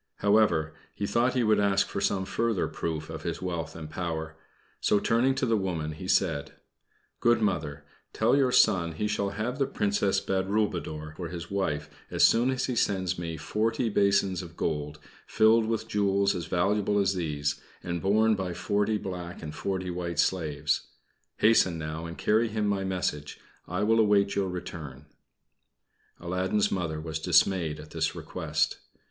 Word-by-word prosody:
However, 100 Hz, -7 st, +2 dB, 0.2 s
he 100 Hz, -, -2 dB
thought 120 Hz, +5 st, +1 dB
he 125 Hz, -, +2 dB
would 110 Hz, -1 st, +3 dB
ask 100 Hz, -1 st, +3 dB
for -, -, -4 dB
some 95 Hz, -1 st, 0 dB
further 115 Hz, -1 st, 0 dB
proof 80 Hz, -2 st, -4 dB
of -, -, -7 dB
his -, -, -3 dB
wealth 85 Hz, -3 st, -4 dB
and 80 Hz, -1 st, -7 dB
power; 80 Hz, -1 st, -4 dB, 0.4 s
so, 105 Hz, -, +3 dB
turning 125 Hz, +5 st, +2 dB
to 130 Hz, -, 0 dB
the 115 Hz, -2 st, +2 dB
woman, 85 Hz, -6 st, -2 dB
he 85 Hz, +4 st, -8 dB
said: 80 Hz, -7 st, +1 dB, 0.7 s
"Good 120 Hz, -1 st, +4 dB
Mother, 95 Hz, -9 st, -2 dB, 0.3 s
tell 115 Hz, +4 st, +2 dB
your 135 Hz, -3 st, +3 dB
son 85 Hz, -8 st, +4 dB
he 105 Hz, +7 st, -2 dB
shall 100 Hz, -1 st, -1 dB
have 110 Hz, +7 st, -3 dB
the 135 Hz, -, +2 dB
Princess 100 Hz, -5 st, +1 dB
Badroulboudour 95 Hz, -6 st, -2 dB
for 90 Hz, -, -4 dB
his 85 Hz, 0 st, -7 dB
wife 75 Hz, -7 st, -1 dB, 0.2 s
as -, -, +1 dB
soon 120 Hz, +3 st, +5 dB
as 130 Hz, -1 st, 0 dB
he 125 Hz, -, -2 dB
sends 95 Hz, -5 st, 0 dB
me 85 Hz, -2 st, -4 dB
forty 110 Hz, -, -1 dB
basins 100 Hz, -2 st, +2 dB
of 85 Hz, -2 st, -11 dB
gold, 75 Hz, -1 st, -2 dB, 0.3 s
filled 110 Hz, +1 st, +4 dB
with 110 Hz, 0 st, -2 dB
jewels 100 Hz, -1 st, +2 dB
as 85 Hz, -3 st, -4 dB
valuable 100 Hz, +3 st, +1 dB
as 100 Hz, -1 st, +2 dB
these, 75 Hz, -5 st, -2 dB, 0.2 s
and 85 Hz, -1 st, -3 dB
borne 110 Hz, +3 st, +3 dB
by 95 Hz, -4 st, -3 dB
forty 105 Hz, +4 st, 0 dB
black 90 Hz, -4 st, -6 dB
and 75 Hz, -1 st, -6 dB
forty 95 Hz, +1 st, -3 dB
white 85 Hz, -2 st, -4 dB
slaves. 75 Hz, -5 st, 0 dB, 0.5 s
Hasten 100 Hz, -6 st, +4 dB
now 80 Hz, +1 st, -5 dB
and 85 Hz, -, -8 dB
carry 110 Hz, +2 st, +2 dB
him 110 Hz, -1 st, -2 dB
my 100 Hz, -1 st, 0 dB
message. 90 Hz, -6 st, -3 dB, 0.3 s
I 90 Hz, +4 st, -2 dB
will 115 Hz, +2 st, +3 dB
await 100 Hz, -2 st, +3 dB
your 100 Hz, -2 st, 0 dB
return." 75 Hz, -6 st, -7 dB, 1.1 s
Aladdin's 90 Hz, +4 st, 0 dB
Mother 80 Hz, -4 st, -2 dB
was 80 Hz, 0 st, -4 dB
dismayed 80 Hz, -2 st, +2 dB
at 75 Hz, 0 st, -11 dB
this 80 Hz, -1 st, -1 dB
request. -, -, -2 dB
95 Hz, 165 wpm, -28 LUFS, 80-105 Hz, 1.1 s, soon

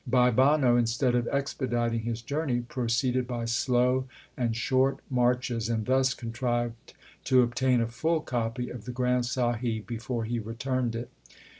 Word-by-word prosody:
Bhai 125 Hz, 0 st, +4 dB
Banno, 130 Hz, 0 st, +4 dB
instead 120 Hz, +2 st, +1 dB
of 120 Hz, -1 st, +1 dB
expediting 120 Hz, -4 st, -1 dB
his 115 Hz, 0 st, -4 dB
journey, 140 Hz, -2 st, -1 dB
proceeded 125 Hz, 0 st, -1 dB
by 120 Hz, -2 st, -3 dB
slow 125 Hz, +2 st, +1 dB, 0.3 s
and 115 Hz, -3 st, -1 dB
short 130 Hz, +3 st, +2 dB
marches, 125 Hz, -2 st, +1 dB
and 110 Hz, -2 st, -1 dB
thus 130 Hz, 0 st, +2 dB
contrived 120 Hz, 0 st, -3 dB, 0.3 s
to 130 Hz, -1 st, +5 dB
obtain 125 Hz, +1 st, +2 dB
a 115 Hz, -, 0 dB
full 160 Hz, +7 st, 0 dB
copy 120 Hz, -1 st, -3 dB
of 120 Hz, -4 st, -8 dB
the 125 Hz, -, -4 dB
Granth 125 Hz, 0 st, +1 dB
Sahib 120 Hz, -3 st, -1 dB
before 115 Hz, +1 st, -3 dB
he 120 Hz, +1 st, -2 dB
returned 120 Hz, +2 st, -2 dB
it. 120 Hz, +1 st, -5 dB
120 Hz, 150 wpm, -28 LUFS, 115-130 Hz, 0.3 s, to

